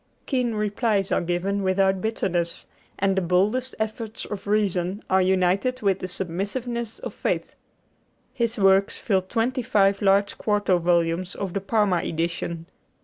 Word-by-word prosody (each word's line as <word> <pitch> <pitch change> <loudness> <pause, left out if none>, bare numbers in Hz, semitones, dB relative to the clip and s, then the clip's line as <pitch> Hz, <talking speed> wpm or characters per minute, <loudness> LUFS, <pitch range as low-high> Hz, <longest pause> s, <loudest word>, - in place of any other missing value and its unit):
Keen 250 -5 0
replies 210 -1 0
are - - +2
given 180 +4 -1
without 190 0 +2
bitterness, 175 -6 -2 0.3
and 195 0 +1
the 190 - +2
boldest 200 +9 +1
efforts 220 0 -4
of 205 -1 -7
reason 200 -2 0
are 190 0 +5
united 190 +7 +1
with 195 -2 +2
the 185 - -4
submissiveness 205 +7 -3
of - - -7
faith. - - -2 0.8
His 235 -3 -1
works 195 0 +3
fill 195 -4 +1
twenty 230 +7 -1
five 200 -3 +2
large 200 0 +2
quarto 205 -4 +2
volumes 170 +1 +1
of 195 -3 -4
the 195 - -1
Parma 205 -2 +2
edition. 170 0 -3
195 Hz, 145 wpm, -24 LUFS, 185-215 Hz, 0.8 s, are